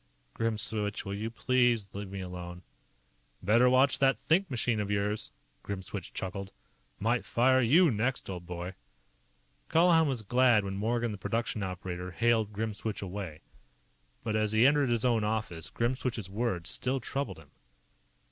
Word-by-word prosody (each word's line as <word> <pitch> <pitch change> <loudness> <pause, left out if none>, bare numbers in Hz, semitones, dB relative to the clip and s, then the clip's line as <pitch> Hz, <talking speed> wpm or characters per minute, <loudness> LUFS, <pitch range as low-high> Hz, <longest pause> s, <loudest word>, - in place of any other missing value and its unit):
"Grimswitch, 110 -2 0
will 100 - -4
you 105 +3 -3
please 120 -2 +1
let 100 0 -5
me 95 0 -6
alone?" 90 -1 -7 0.8
"Better 115 +6 +5
watch 130 +2 +4
that 135 0 +4
think 180 +3 +1
machine 120 -3 0
of 105 -1 -2
yours," 105 +1 -1 0.3
Grimswitch 95 -1 -6
chuckled. 95 +1 -5 0.5
"Might 115 +4 +1
fire 130 +2 +3
you 155 +7 +5
next, 120 +4 -1
old 90 -2 -6
boy." 90 +1 -5 1.0
Colihan 165 -1 +5
was 125 -5 -2
glad 125 0 +4
when 95 - -3
Morgan, 115 +3 0
the 105 - -7
production 115 +1 -2
operator, 90 -1 -4
hailed 110 +3 +1
Grimswitch 105 0 -3
away. 95 -5 -6 0.8
But 110 -1 -1
as 110 0 +1
he 110 +3 +5
entered 145 -1 +4
his 120 0 +1
own 115 -3 +3
office, 105 -6 -2
Grimswitch's 120 -4 -2
words 100 -6 -1
still 135 +1 0
troubled 140 +3 -3
him. - - -16
110 Hz, 145 wpm, -30 LUFS, 100-125 Hz, 1.0 s, Better